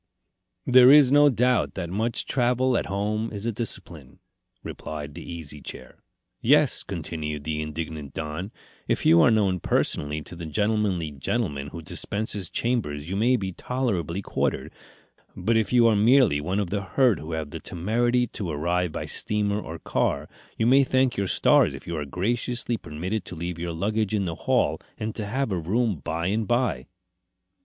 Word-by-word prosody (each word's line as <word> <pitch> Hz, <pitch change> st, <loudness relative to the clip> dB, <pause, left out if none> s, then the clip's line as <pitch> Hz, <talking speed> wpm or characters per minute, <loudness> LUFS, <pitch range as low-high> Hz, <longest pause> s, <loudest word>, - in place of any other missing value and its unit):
"There 125 Hz, 0 st, +7 dB
is 145 Hz, -3 st, +7 dB
no 145 Hz, 0 st, +7 dB
doubt 125 Hz, 0 st, +1 dB
that 85 Hz, -3 st, -4 dB
much 110 Hz, +4 st, -1 dB
travel 125 Hz, 0 st, +1 dB
at -, -, 0 dB
home 105 Hz, +3 st, -2 dB
is 105 Hz, 0 st, -6 dB
a 115 Hz, -, +1 dB
discipline," 90 Hz, -, -6 dB, 0.5 s
replied 75 Hz, -2 st, -7 dB
the -, -, -8 dB
Easy 75 Hz, -4 st, -8 dB
Chair. -, -, -10 dB, 0.4 s
"Yes," -, -, +4 dB
continued 75 Hz, -2 st, -5 dB
the 75 Hz, 0 st, -2 dB
indignant 75 Hz, -2 st, -6 dB
Don. 80 Hz, +6 st, -4 dB, 0.4 s
"If -, -, 0 dB
you 85 Hz, +1 st, +7 dB
are -, -, +6 dB
known 100 Hz, -5 st, +2 dB
personally 75 Hz, -1 st, 0 dB
to 90 Hz, -, -10 dB
the 85 Hz, -1 st, -7 dB
gentlemanly 105 Hz, -3 st, 0 dB
gentleman 70 Hz, -, -2 dB
who 80 Hz, +3 st, -8 dB
dispenses 100 Hz, +2 st, -2 dB
chambers 85 Hz, -11 st, -2 dB
you -, -, -1 dB
may 120 Hz, +5 st, +3 dB
be 95 Hz, -4 st, -3 dB
tolerably 100 Hz, -, -2 dB
quartered. -, -, -2 dB, 0.6 s
But 115 Hz, -, 0 dB
if 110 Hz, -2 st, +1 dB
you 120 Hz, -2 st, +5 dB
are 115 Hz, -2 st, +5 dB
merely 115 Hz, -, +4 dB
one 90 Hz, +6 st, -2 dB
of 100 Hz, -4 st, -2 dB
the 100 Hz, 0 st, -1 dB
herd 120 Hz, +3 st, +2 dB
who 80 Hz, +1 st, -6 dB
have 80 Hz, -2 st, -4 dB
the -, -, -6 dB
temerity 120 Hz, +7 st, 0 dB
to 100 Hz, -6 st, -6 dB
arrive 85 Hz, +3 st, 0 dB
by -, -, -4 dB
steamer 105 Hz, -1 st, +1 dB
or 80 Hz, -3 st, -7 dB
car, -, -, -1 dB, 0.3 s
you 110 Hz, -, +1 dB
may 135 Hz, +3 st, +6 dB
thank 130 Hz, -1 st, +2 dB
your 100 Hz, -1 st, -1 dB
stars -, -, +4 dB
if -, -, -11 dB
you 85 Hz, -, -4 dB
are 75 Hz, -2 st, -3 dB
graciously 120 Hz, -, -1 dB
permitted 90 Hz, +3 st, -4 dB
to -, -, -7 dB
leave 85 Hz, +1 st, -5 dB
your 85 Hz, 0 st, -3 dB
luggage 105 Hz, +4 st, -1 dB
in 100 Hz, -2 st, 0 dB
the 85 Hz, -, -2 dB
hall -, -, 0 dB, 0.2 s
and 110 Hz, 0 st, -3 dB
to 105 Hz, -2 st, -5 dB
have 130 Hz, +2 st, -1 dB
a 90 Hz, -, 0 dB
room 105 Hz, +4 st, 0 dB
by 80 Hz, +4 st, -3 dB
and 105 Hz, +3 st, 0 dB
by." 120 Hz, -, 0 dB
100 Hz, 180 wpm, -25 LUFS, 80-115 Hz, 0.6 s, There